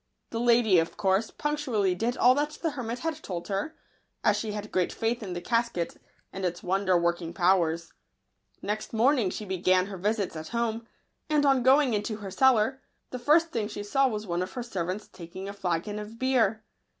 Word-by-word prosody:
The 230 - -2
lady, 235 -6 +5
of 165 - -2
course, 195 +3 +1
punctually 260 -11 0
did 230 +7 -1
all 250 +1 +6
that 290 +2 0
the 325 - +1
hermit 245 -4 -4
had 315 +3 -4
told 175 -1 -6
her, 200 +11 -2 0.5
as 210 - +4
she 210 0 -3
had 210 0 -6
great 185 -2 +1
faith 230 +2 -1
in 190 -4 -5
the 175 - -4
casket 230 -7 -1 0.4
and 195 - -5
its 175 -1 -2
wonder 185 0 +2
working 170 0 -1
powers. 170 -3 +2 0.7
Next 215 +2 -3
morning 235 -2 +3
she 210 - -5
began 185 -1 +2
her 195 -1 -7
visits 205 -1 -1
at 155 0 -6
home; 230 -1 -2 0.4
and 300 -1 +3
on 270 -2 +4
going 265 0 +4
into 210 +1 -1
her 205 -2 -7
cellar, 265 +3 +3 0.3
the 255 - -4
first 320 +6 +3
thing 220 -3 -1
she 210 -1 -6
saw 270 +6 +2
was 215 -3 -3
one 175 -2 -1
of 185 +1 -4
her 245 - -4
servants 190 -3 -4
taking 185 +2 -9
a 200 - -5
flagon 195 +1 -2
of 210 +2 -8
beer. 230 -4 +1
210 Hz, 195 wpm, -28 LUFS, 185-240 Hz, 0.7 s, all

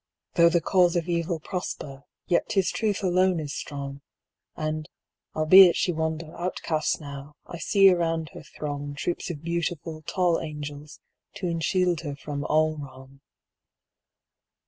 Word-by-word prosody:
Though 170 -1 +6
the 170 0 +2
cause 180 0 +3
of 170 0 0
Evil 170 -1 -1
prosper, 145 -5 -6 0.2
yet 175 - +1
'tis 195 -3 +1
Truth 210 -2 -1
alone 185 -1 +3
is 145 -2 -5
strong, 140 -1 -6 0.5
And, 155 0 -3 0.5
albeit 175 +3 +8
she 180 - +1
wander 160 0 -3
outcast 170 -3 -1
now, 140 -1 -9
I 170 - -8
see 195 +2 +5
around 165 -3 0
her - - -11
throng 145 -1 -6
Troops 175 +6 -3
of 160 -3 -6
beautiful, 170 -1 -3
tall 175 +2 +1
angels, 150 -1 -7 0.3
to 200 -2 -5
enshield 175 0 +1
her 145 -3 -5
from 145 0 -5
all 155 0 +2
wrong. 135 0 -11
160 Hz, 140 wpm, -26 LUFS, 145-175 Hz, 0.5 s, albeit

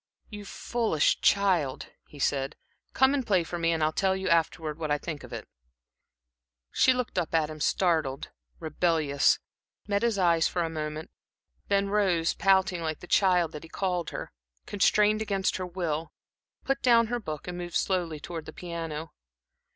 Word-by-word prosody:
"You 210 -2 -8
foolish 220 -7 0
child," 185 -9 +2 0.2
he 150 - -14
said, 135 0 0 0.4
"come 265 +1 +4
and 280 -2 0
play 190 -6 +2
for 175 +1 -5
me, 165 0 +2
and 160 -2 0
I'll 155 - +2
tell 190 +3 +1
you, 190 0 -3
afterwards, 160 -2 0
what 155 -2 -3
I 145 - +2
think 150 -1 -6
of - - -11
it." - - -7 1.2
She 260 - +4
looked 250 -7 -1
up 165 -1 -2
at 155 -1 +1
him 155 - -9
startled, 155 -5 0 0.3
rebellious, 155 -3 +2 0.5
met 200 -1 +1
his 235 -3 +1
eyes 170 -3 +3
for 175 - -1
a 165 - -3
moment, 155 0 -5 0.6
then 200 0 +1
rose, 185 -5 +2
pouting, 190 -2 +2
like 160 -2 -3
the - - -9
child 180 -3 +3
that 150 - -8
he 165 - -12
called 180 -3 -2
her, - - -6 0.3
constrained 210 +1 +3
against 200 -3 0
her 185 -1 -4
will, 165 -3 -3 0.5
put 270 0 -1
down 235 -2 +5
her 240 +2 -2
book, 155 -8 -6
and 180 - -4
moved 175 -1 -6
slowly 175 -5 0
toward 165 +1 -7
the 155 - -8
piano. 165 -3 -6
175 Hz, 175 wpm, -28 LUFS, 155-195 Hz, 1.2 s, down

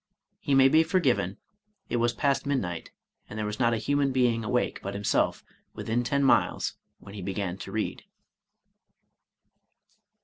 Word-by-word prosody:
He 140 - +1
may 135 0 +7
be 155 +4 +5
forgiven, 130 - +1 0.5
it 120 - -1
was 120 0 +2
past 140 +4 0
midnight, 90 -12 -2 0.4
and 105 - -7
there 110 - -2
was 105 +2 -4
not 120 -2 +3
a - - -1
human 140 +3 +1
being 120 -3 +2
awake 120 +3 0
but 100 +1 -5
himself 100 0 0 0.3
within 120 +2 -1
ten 140 +3 0
miles 135 - +2 0.2
when 100 - -13
he 105 - -7
began 95 -1 -3
to 95 - -7
read. 110 +2 -3
120 Hz, 150 wpm, -27 LUFS, 100-135 Hz, 0.5 s, may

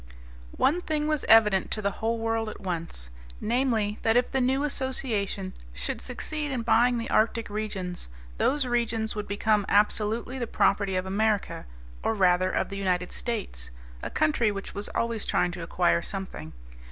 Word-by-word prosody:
One 310 +7 +3
thing 305 -3 -1
was 305 -2 0
evident 210 -4 +5
to 215 - 0
the 200 - +1
whole 230 +1 +1
world 225 -1 -1
at - - -9
once, 165 - -5 0.3
namely, 225 -3 0
that 225 +1 +3
if 245 - +1
the 265 - +1
new 265 +3 +2
association 235 -9 -1 0.2
should - - -3
succeed 295 +4 -4
in 255 -4 -2
buying 240 +2 +4
the 230 - -3
Arctic 225 0 +1
regions, 195 - -4 0.3
those 285 0 +2
regions 230 -3 0
would 210 -1 -4
become 210 +1 +2
absolutely 215 +5 +1
the 240 - -2
property 200 -3 +2
of 185 0 0
America 205 - 0 0.3
or 225 - 0
rather 185 -2 +3
of - - -1
the 195 - -5
United 180 -2 0
States, 200 - -4 0.3
a - - -4
country 210 +8 +2
which 195 -1 -6
was 205 - -4
always 230 -2 -1
trying 180 - +1
to 175 0 -7
acquire 170 0 +2
something. 180 - -6
215 Hz, 165 wpm, -27 LUFS, 190-240 Hz, 0.3 s, evident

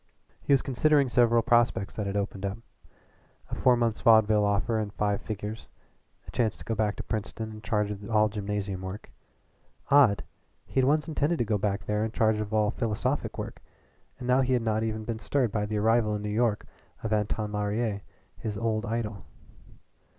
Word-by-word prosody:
He - - -2
was 140 - +5
considering 140 +1 +3
several 120 -2 +4
prospects 120 -4 +2
that 105 -2 -3
had 100 +1 -2
opened 100 -1 -3
up, 100 +2 -2 0.9
a - - -6
four 125 -1 +4
months' 115 -2 0
vaudeville 110 -2 +5
offer 105 +2 +1
in 105 -1 -2
five 105 0 -1
figures, 105 +1 -6 0.6
a - - -8
chance 115 -4 0
to - - -12
go 115 - -1
back 105 -1 0
to - - -6
Princeton 110 +1 -4
in 110 0 -10
charge 105 -2 0
of 100 +1 -7
all 110 -1 +4
gymnasium 100 -2 -3
work. 95 +2 -7 0.8
Odd! 135 -8 +5 0.4
He - - -1
had 130 - +4
once 150 +3 +2
intended 160 +1 0
to 120 - 0
go 105 -1 0
back 100 0 -1
there 105 0 0
in 110 0 -3
charge 110 -1 +2
of 105 0 -4
all 105 -1 +2
philosophic 120 +4 -2
work, - - -6 0.6
and 125 - -7
now 125 +1 +4
he 130 0 +1
had 120 -2 +1
not 110 -1 0
even 110 -1 -2
been 110 0 -4
stirred 120 +1 0
by 105 0 -1
the 105 0 -2
arrival 110 0 +2
in 105 - -4
New 105 - -3
York 110 0 +1 0.4
of 110 -1 -1
Anton 105 0 -1
Laurier, 105 0 -1 0.4
his 105 -2 -4
old 110 0 -1
idol. 110 -3 -3
110 Hz, 195 wpm, -28 LUFS, 105-115 Hz, 0.9 s, was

